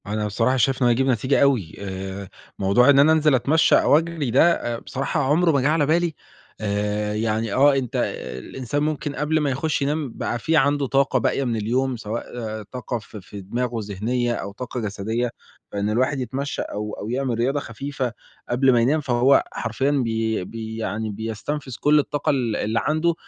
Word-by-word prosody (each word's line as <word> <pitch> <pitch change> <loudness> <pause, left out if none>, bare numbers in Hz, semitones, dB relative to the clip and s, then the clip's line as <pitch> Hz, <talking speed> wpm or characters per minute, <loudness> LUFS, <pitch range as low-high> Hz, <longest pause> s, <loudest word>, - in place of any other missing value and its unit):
أنا 105 +1 -1
بصراحة 115 +5 +1
شايف 130 +2 +1
إنه 125 - +4
هيجيب 130 +3 +2
نتيجة 130 +2 +2
أوي 125 - +2
آآ، 95 0 -6 0.3
موضوع 100 +7 +4
إن 140 -1 +7
أنا 150 +3 +6
أنزِل 155 -3 +4
أتمشّى 150 +5 +4
أو 145 - +5
أجرِي 165 -5 -2
ده 170 +8 +5
آآ 120 -6 -3
بصراحة 135 +5 -2
عمره 160 +5 +3
ما 140 -3 +2
جِه 135 - +2
على 155 -1 +2
بالي 170 +2 +1 0.5
آآ، 105 0 -1
يعني 110 0 -1
آه، 140 +1 +5
أنت 130 -4 -2 0.4
الإنسان 135 - -3
ممكن 150 -1 -2
قبل 150 +2 +1
ما 150 -2 0
يخُش 150 +4 -1
ينام 145 -1 -1
بقى 120 - -3
في 160 +7 +1
عندُه 145 0 +2
طاقة 135 0 +2
باقية 135 - 0
من 120 -3 -1
اليوم، 125 +4 0
سواء 110 +1 -4 0.4
طاقة 125 +2 -5
في 105 -1 -11
في 100 +2 -10
دماغه 120 +4 -2
ذهنية 120 +5 -1
أو 100 -3 -5
طاقة 125 +4 -6
جسدية، 110 +3 -2 0.4
فإن 100 +1 -1
الواحد 130 +5 +1
يتمشى 135 +2 -3
أو 105 0 -5
أو 105 - -6
يعمل 125 -1 -1
رياضة 135 +5 +1
خفيفة 135 0 -4 0.4
قبل 130 +2 +3
ما 120 - +4
ينام 140 +7 +2
فهو 130 0 +3
حرفيًا 130 +5 -1
بي 115 -6 0
بي 110 +1 -7
يعني 110 0 -3
بيستنفِذ 115 +6 -5
كلّ 150 +1 +4
الطاقة 145 0 -1
ال 120 -6 +1
اللي 110 +2 0
عَنده. 155 +5 +1
125 Hz, 185 wpm, -23 LUFS, 110-140 Hz, 0.5 s, إن